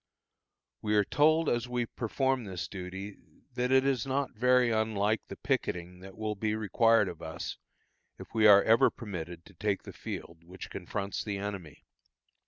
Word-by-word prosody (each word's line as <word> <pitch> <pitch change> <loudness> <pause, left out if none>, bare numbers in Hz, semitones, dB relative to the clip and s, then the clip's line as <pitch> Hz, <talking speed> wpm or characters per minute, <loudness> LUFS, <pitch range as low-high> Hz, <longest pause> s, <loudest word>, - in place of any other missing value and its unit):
We 105 0 0
are 105 - +5
told, 155 +7 +3
as 120 0 0
we 125 -1 0
perform 130 +2 -1
this 90 -5 -5
duty, 95 +1 -7 0.4
that 125 +1 -1
it 130 0 +5
is 135 -4 +1
not 135 +1 -1
very 125 +1 +3
unlike 110 -1 +1
the - - -7
picketing 90 +1 -2
that 95 +1 -12
will 110 0 -2
be 105 +1 -1
required 110 0 +3
of 85 -2 -7
us 80 0 -6 0.6
if - - -12
we 110 -1 +5
are 100 -1 +8
ever 115 +1 +5
permitted 90 -6 -7
to 100 - -16
take 100 +2 -1
the - - -9
field 85 0 -7
which 90 +2 -10
confronts 100 +2 -4
the 100 -2 -3
enemy. 100 -7 -6
105 Hz, 170 wpm, -30 LUFS, 95-120 Hz, 0.6 s, are